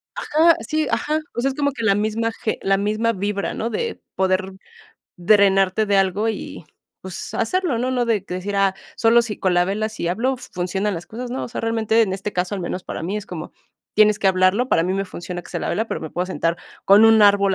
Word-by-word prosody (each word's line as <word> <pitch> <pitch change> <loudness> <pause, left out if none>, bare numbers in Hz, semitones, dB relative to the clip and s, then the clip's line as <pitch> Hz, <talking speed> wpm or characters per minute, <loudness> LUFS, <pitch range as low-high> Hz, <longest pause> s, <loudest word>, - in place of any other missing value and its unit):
Ajá, 325 +2 +3
sí, 310 -2 0
ajá. 305 +4 0 0.2
O 235 - -1
sea, 270 - +1
es 265 - -5
como 285 -1 0
que 230 - -6
la 200 -2 +3
misma 220 +2 -1
ge 220 - -1
la 195 0 +2
misma 215 +3 0
vibra, 200 0 -2
¿no?, 230 - -3
de 465 - -3 0.2
poder 190 0 0 0.6
drenarte 195 +2 +3
de 200 -1 +2
algo 195 +3 +1
y, 215 -5 -5 0.4
pues, 185 -1 -6
hacerlo, 345 -1 0
¿no? 250 +2 -1
No 250 -1 +1
de 225 -4 +1
decir, 185 +3 -4
ah, 195 -1 +2 0.2
solo 235 +1 +4
si 220 -3 -5
con 185 -2 +1
la 175 0 +4
vela 210 +4 -1
si 195 -6 -4
hablo 250 +8 0
funcionan 190 -2 -3
las 170 0 -7
cosas, 245 +2 -7
no. 260 - -3
O - - -7
sea, - - -5
realmente, 225 0 +2
en 190 -4 -1
este 195 +2 -4
caso, 180 +3 -1
al 195 - -4
menos 180 +1 -4
para - - -6
mí 190 +5 -2
es 210 - -6
como, 170 -2 -7 0.4
tienes 210 -1 +5
que - - 0
hablarlo, 190 +6 +3
para 165 - +3
mí 180 +2 -1
me 195 +1 -1
funciona 175 -1 -7
que - - -14
sea - - -3
la - - -3
vela, 220 +2 -1
pero, - - -4
me 160 - -6
puedo 180 +1 -2
sentar 170 -2 -1 0.3
con 200 +3 +7
un 225 -1 +6
árbol 200 -1 +4
205 Hz, 235 wpm, -21 LUFS, 190-230 Hz, 0.6 s, con